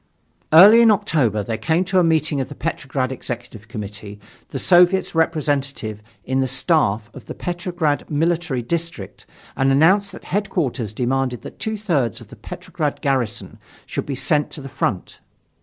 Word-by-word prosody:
Early 200 +9 +9
in 230 - +6
October 155 - +1
there 110 +2 -4
came 160 +9 +1
to 185 +1 +2
a - - +4
meeting 155 -3 +1
of 130 - -5
the 145 - -9
Petrograd 140 -5 -3
Executive 120 -4 -7
Committee, 105 -2 -8 0.3
the - - -5
Soviet's 180 +1 +4
representative 145 -9 -1 0.2
in 130 +1 0
the 130 - +1
staff 125 - +1
of - - -12
the - - -7
Petrograd 175 -4 -2
Military 160 -4 0
District 165 - -5 0.3
and 135 0 +2
announced 185 +9 +4
that - - -11
Headquarters 155 - -2
demanded 125 +2 -1
that - - -10
two 220 0 -3
thirds 150 - -1
of - - -14
the - - -12
Petrograd 150 -2 -5
garrison 130 -7 -2 0.3
should - - -4
be 140 - -3
sent 150 +2 +1
to 150 - -6
the 135 - -8
front. 95 -6 -3
145 Hz, 160 wpm, -21 LUFS, 120-170 Hz, 0.3 s, Early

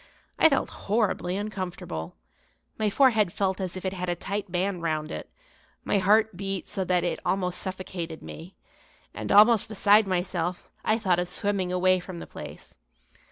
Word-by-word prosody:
I 320 - +7
felt 275 - 0
horribly 200 -4 0
uncomfortable, 185 - -5 0.6
my 215 -1 +2
forehead 220 -5 +4
felt 190 0 -1
as 185 0 -3
if 185 - -7
it 190 - -1
had 180 -1 -3
a 175 - 0
tight 200 +2 -4
band 180 0 -1
round 155 -1 -2
it, - - -6 0.5
my 200 - +1
heart 210 +2 +3
beat 195 0 -4
so 190 - -2
that 180 -1 +2
it 175 - -1
almost 180 -2 0
suffocated 185 -3 -5
me, 170 +4 -10 0.6
and, - - -4
almost 215 +1 +6
beside 210 -1 +4
myself, 180 -1 -2
I 215 - +2
thought 185 -6 +2
of 180 - -1
swimming 190 -1 -1
away 185 0 +3
from 180 0 -8
the - - -7
place. - - -10
185 Hz, 165 wpm, -27 LUFS, 180-205 Hz, 0.6 s, I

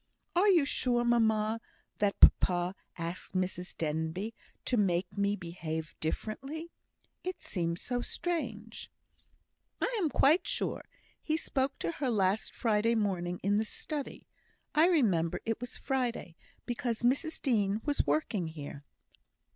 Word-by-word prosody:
"Are 370 +4 +5
you 345 -8 +6
sure, 245 -3 +1
mamma, 220 -2 +2 0.4
that 205 -1 +1
papa 175 0 +6 0.2
asked 170 +3 -5
Mrs 185 -1 -2
Denbigh 160 +7 -2 0.3
to 250 - +1
make 185 -4 +1
me 200 0 +1
behave 160 -3 -5
differently? 270 - -4 0.5
It 370 0 -4
seems 170 -2 -1
so 245 -1 -1
strange." 235 -11 -3 0.9
"I - - 0
am 325 - +2
quite 300 +5 +4
sure. - - -1 0.4
He 315 0 0
spoke 270 -4 -1
to 165 - -2
her 265 - -2
last 200 -2 +1
Friday 230 0 +2
morning 180 -5 -1
in 200 +2 +3
the 220 - +1
study. 290 +5 -5 0.5
I 315 +3 +6
remember 200 - +2
it 225 +1 -1
was 245 +1 -4
Friday, 245 -10 -2 0.3
because 240 -1 -2
Mrs 280 +6 +1
Dean 210 -6 +1
was 290 -1 +1
working 210 - +1
here." 145 -3 -8
220 Hz, 130 wpm, -31 LUFS, 180-265 Hz, 0.9 s, you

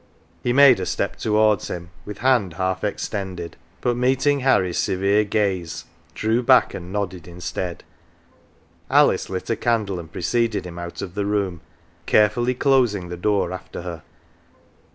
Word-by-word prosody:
He 120 - 0
made 135 -1 +7
a - - -2
step - - -2
towards 110 -2 +2
him 85 0 -6 0.2
Avith 105 - -6
hand 120 -9 +2
half 95 +2 -2
extended, 95 -4 -4 0.3
but 120 - +1
meet 130 +2 +1
ing 145 -1 +3
Harry's 95 -10 +2
severe 100 +3 +2
gaze, 100 -5 -1 0.3
drew 110 +3 +1
back, 125 +1 +4
and 90 0 -7
nodded 95 -4 -4
instead. 90 0 -5 1.1
Alice - - +3
lit 95 +4 -4
a - - +2
candle 110 -6 0
and 80 -2 -10
preceded 115 -2 -1
him 85 -1 -8
out 85 0 -6
of 90 - -7
the 100 0 -2
room, 100 -5 -1 0.5
carefully 120 +4 +3
closing 120 -10 +2
the 90 - -4
door 100 0 0
after 90 - -8
her. 85 -2 -6
100 Hz, 155 wpm, -22 LUFS, 90-115 Hz, 1.1 s, made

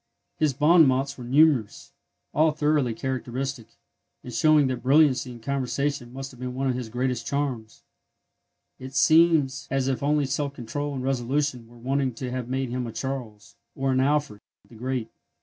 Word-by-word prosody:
His 155 -3 +2
bon 155 +2 +6
mots 135 +1 0
are - - -7
numerous, 135 -3 +2 0.4
all 155 0 +3
thoroughly 150 -6 +1
characteristic, 130 -1 -4 0.6
and 125 - -8
showing 150 +5 +4
that 130 -2 -2
brilliancy 135 -2 +3
in 120 -1 -11
conversation 140 0 -2
must 135 +1 -7
have 125 - -16
been 125 0 -5
one 135 +1 -2
of 130 - +1
his 125 -2 -5
greatest 125 0 -2
charms. 135 -6 -3 1.0
It 130 +1 -9
seems 155 -2 +4
as 135 -1 0
if 135 -2 -1
only 145 0 +2
self 140 +1 -2
control 140 +4 -4
and 130 - -4
resolution 130 -1 -1
were 120 +1 -17
wanting 130 +1 -1
to 125 +1 -5
have 125 -1 -4
made 130 0 -1
him 125 -1 -2
a - - -5
Charles, 125 -5 -6 0.2
or 135 0 0
an 130 - +2
Alfred, 140 -5 0 0.3
the - - -18
Great. 125 0 -4
130 Hz, 170 wpm, -25 LUFS, 125-140 Hz, 1.0 s, bon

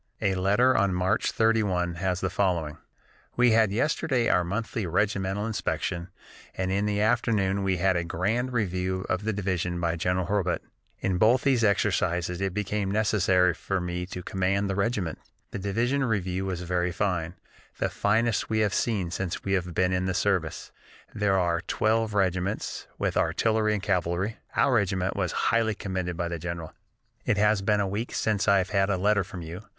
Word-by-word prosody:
A 95 - +1
letter 100 +8 +3
on 100 -2 +2
March 95 +3 +1
31 100 -6 +1
has 90 +1 -2
the 95 - -1
following: 85 -6 -1 0.6
"We 125 -1 +5
had 110 -2 +4
yesterday 130 +1 +1
our 90 - +3
monthly 105 +2 -3
regimental 95 +2 0
inspection 90 -5 -2 0.5
and 95 0 -1
in 100 +2 +1
the 105 0 0
afternoon 100 -2 +1
we 95 -1 +1
had 95 +1 +2
a 85 - 0
grand 110 +10 -1
review 95 -4 -1
of 95 +3 -1
the 110 - +1
division 90 -3 -2
by 85 -1 0
General 90 +2 0
Hurlbut. 100 -1 0 0.4
In 95 -2 0
both 120 +4 +4
these 130 -4 +3
exercises 90 -3 +1
it 95 -1 0
became 105 0 -2
necessary 95 -4 +3
for 95 +3 -2
me 90 0 -3
to 90 -1 -7
command 95 +2 0
the 100 - -1
regiment. 100 - -1 0.3
The - - -4
division 115 +8 0
review 95 -5 -1
was 90 -2 -3
very 90 0 0
fine, 90 -3 -1 0.4
the - - 0
finest 110 +2 +1
we 110 - 0
have 105 -3 +1
seen 100 -7 0
since 95 -1 -3
we 95 - -1
have 90 -3 -1
been 95 0 +2
in 90 0 0
the 95 - -1
service. 90 -4 -1 0.4
There 105 -2 +1
were 85 -2 +1
twelve 110 0 +1
regiments, 95 +1 -1
with - - -1
artillery 110 -1 +2
and 100 - -4
cavalry. 90 +3 0 0.2
Our 135 - +3
regiment 95 -4 +1
was 90 -4 -1 0.2
highly 110 -2 +2
commended 95 -3 -3
by 85 -1 -1
the 85 -1 -4
general. 85 -1 -5 0.5
"It 105 - +1
has 105 -1 +3
been 105 +1 +2
a 100 - +1
week 105 +5 -4
since 105 -2 0
I 100 -1 +6
have 95 0 -1
had 100 -1 +2
a 100 - +1
letter 100 +1 +2
from 90 -2 -8
you. 85 +4 -7
95 Hz, 180 wpm, -27 LUFS, 90-105 Hz, 0.6 s, I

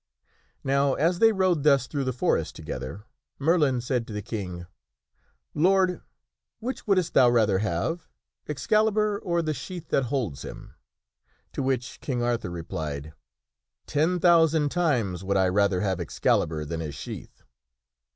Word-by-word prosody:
Now 140 0 +2
as 170 +4 +1
they 225 0 +6
rode 185 -6 +2
thus 140 -3 +4
through 140 -1 -3
the 130 - 0
forest 125 - 0
together, 70 +10 -6 0.3
Merlin 145 -4 +2
said 125 -1 -1
to 110 - -7
the 105 -1 -4
King: 95 -6 -5 0.4
" - - -44
Lord, 185 +3 +3 0.6
which 245 +2 -5
wouldst 185 -4 +2
thou 125 -2 +6
rather 110 -5 +3
have, 110 - -2 0.4
Excalibur, 210 +8 +1
or 170 -3 -1
the 155 -1 -1
sheath 175 +5 -7
that 135 - +2
holds 115 - -2
him?" - - -9 0.8
To - - -2
which 130 -3 -2
King 125 -4 -2
Arthur 120 -5 -1
replied, 80 -3 -5 0.7
"Ten 160 +5 +1
thousand 165 -3 +4
times 125 - 0
would 100 +1 0
I 95 -1 +3
rather 100 -1 +2
have 95 -3 0
Excalibur 80 -2 0
than 80 +2 -4
his 75 -3 -5
sheath." - - -9
130 Hz, 145 wpm, -26 LUFS, -, 0.8 s, they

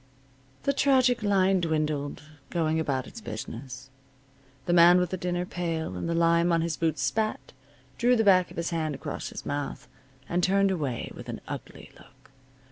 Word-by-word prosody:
The 280 - +2
tragic 260 -3 +3
line 195 -2 +3
dwindled, 155 -3 -1 0.3
going 160 -2 0
about 135 -5 -1
its 230 - -10
business. 125 - -7 0.7
The 175 - +1
man 175 +1 +7
with 180 -1 -1
the - - 0
dinner 180 0 -2
pail 165 - -3
and 90 - -3
the 170 - 0
lime 170 +1 +3
on 165 -1 +3
his 165 -1 -1
boots 160 -4 -1
spat, 215 +11 -1 0.5
drew 245 +1 +4
the 225 - +2
back 185 -3 +5
of - - -13
his 170 +1 -2
hand 155 -3 -1
across 145 +2 -5
his - - -8
mouth, 145 -2 -4 0.4
and 175 +1 0
turned 195 +1 +3
away 145 -10 -3
with - - -10
an - - -5
ugly - - -8
look. - - -21
170 Hz, 175 wpm, -27 LUFS, 150-185 Hz, 0.7 s, man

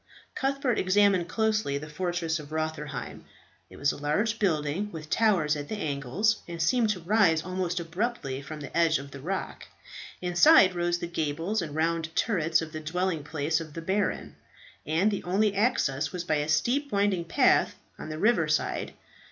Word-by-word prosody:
Cuthbert 270 -3 0
examined 185 -2 +3
closely 215 -8 0
the 150 +2 -7
fortress 170 0 -2
of 150 0 -11
Rotherheim. 155 -1 -4 0.5
It - - -13
was 140 - +2
a - - -8
large 205 +11 0
building, 165 +1 0
with 155 -2 -9
towers 180 -10 +3
at 145 -1 -6
the 215 - -3
angles, 155 - 0
and 170 -1 -7
seemed 220 +7 +2
to 205 -3 -1
rise 170 -3 +3
almost 180 -1 -2
abruptly 170 - -3
from 150 +2 -8
the 145 - -8
edge 165 -2 +3
of 140 0 -9
the 140 - -9
rock. 185 +7 -4 0.5
Inside 185 - +6
rose 175 0 0
the 175 - -4
gables 170 +5 -2
and 150 -3 -6
round 160 0 -1
turrets 165 -7 +1
of 160 - -8
the 155 - -5
dwelling 165 +1 -2
place 155 +2 -1
of 155 -2 -10
the 165 - -5
baron; 195 +3 -2 0.5
and 170 +8 +2
the 200 - -2
only 200 +4 +1
access 155 - +1
was 180 -2 -4
by 155 -4 0
a 150 +1 -2
steep 245 - +1
winding 200 -4 +1
path 165 - +3 0.2
on - - -7
the 155 - -5
river 200 -4 +3
side. 155 0 -1
170 Hz, 175 wpm, -27 LUFS, 155-200 Hz, 0.5 s, Inside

